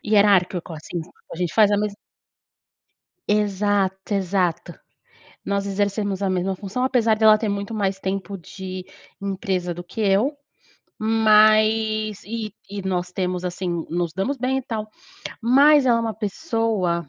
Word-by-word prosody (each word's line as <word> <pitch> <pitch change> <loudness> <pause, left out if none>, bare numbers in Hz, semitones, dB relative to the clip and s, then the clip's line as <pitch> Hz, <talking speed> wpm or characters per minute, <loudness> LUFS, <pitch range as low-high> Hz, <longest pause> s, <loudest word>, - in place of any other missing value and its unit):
hierárquico 195 -5 +3
assim, 160 +2 -6
sabe? 165 - -16 0.2
A - - -6
gente 175 -2 -2
faz 215 -2 +5
mesma. 205 0 0 1.3
Exato, 205 -1 0
exato, 185 -3 -1 0.7
nós 200 0 -1
exercemos 200 0 -1
a 195 - +1
mesma 185 +1 0
função 205 +7 -3
apesar 230 -4 +2
dela 215 -1 +6
ter 215 0 -2
muito 200 +2 -3
mais 195 -2 -1
tempo 195 0 -4
de 185 +1 -8 0.4
empresa 190 -3 -2
do 175 - -7
que 180 +5 -8
eu, 215 +8 +2 0.6
mas 215 -1 +3
e 215 -1 -5
e 200 0 -6
nós 180 -1 -1
temos 180 -1 -2
assim, 175 -2 -3
nos 170 -1 -2
damos 195 +10 -2
bem 260 +2 0
e - - -4
tal, 220 -3 -4 0.5
mas 280 +4 +5
ela 235 -1 +4
é - - 0
uma 225 -1 -2
pessoa. 210 - -1
200 Hz, 145 wpm, -22 LUFS, 185-220 Hz, 1.3 s, dela